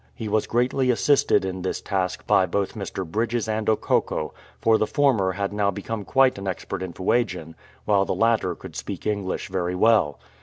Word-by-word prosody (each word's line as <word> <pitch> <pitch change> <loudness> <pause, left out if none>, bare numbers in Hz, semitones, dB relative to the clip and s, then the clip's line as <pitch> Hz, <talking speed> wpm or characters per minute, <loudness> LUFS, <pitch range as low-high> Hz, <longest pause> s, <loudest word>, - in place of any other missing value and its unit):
He 110 - -5
was 105 0 0
greatly 125 +2 +1
assisted 125 -1 +3
in 95 -1 -4
this 95 - -2
task 95 -2 -2
by 95 -1 +4
both 100 -1 -1
Mr. 95 -2 -5
Bridges 115 +6 -1
and 110 -1 -2
Okokko, 110 - 0 0.3
for 110 -1 +3
the 110 - +1
former 120 -11 +2
had 100 +1 -3
now 105 -1 +1
become 100 +2 -4
quite 135 -5 +3
an 100 - -6
expert 95 -1 -4
in 95 -2 -4
Fuegian, 90 -4 -1 0.3
while 100 -2 +3
the - - -2
latter 110 -6 +2
could 90 -4 -11
speak 85 +6 -6
English 100 -3 -2
very 90 -1 -2
well. 105 -8 +3
100 Hz, 185 wpm, -24 LUFS, 95-115 Hz, 0.3 s, by